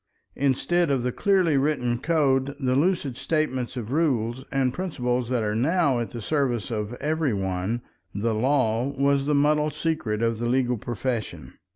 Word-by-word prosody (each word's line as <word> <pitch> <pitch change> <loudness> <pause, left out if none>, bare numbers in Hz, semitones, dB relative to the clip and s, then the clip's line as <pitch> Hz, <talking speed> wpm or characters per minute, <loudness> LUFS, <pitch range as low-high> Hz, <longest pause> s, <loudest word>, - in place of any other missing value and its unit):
Instead 150 +5 +1
of 135 -3 +1
the 125 - 0
clearly 185 - +2
written 135 -4 0
code, 140 -3 +1
the 130 -2 +1
lucid 150 -3 +1
statements 130 -5 -1
of 115 -1 -5
rules 130 -5 0
and 130 -2 +1
principles 125 -9 -2
that 125 -3 0
are 105 0 -1
now 140 +2 +2
at 115 - -3
the 120 -3 -7
service 125 -7 0
of 105 0 -3
every 150 -3 0
one, 95 +4 -2 0.3
the 110 +4 -1
law 120 0 +1
was 140 0 +2
the 150 - +2
muddle 150 +1 +3
secret 150 -8 -2
of 115 -1 0
the 120 - -1
legal 125 -2 +1
profession. 120 +1 -4
130 Hz, 165 wpm, -25 LUFS, 120-150 Hz, 0.3 s, muddle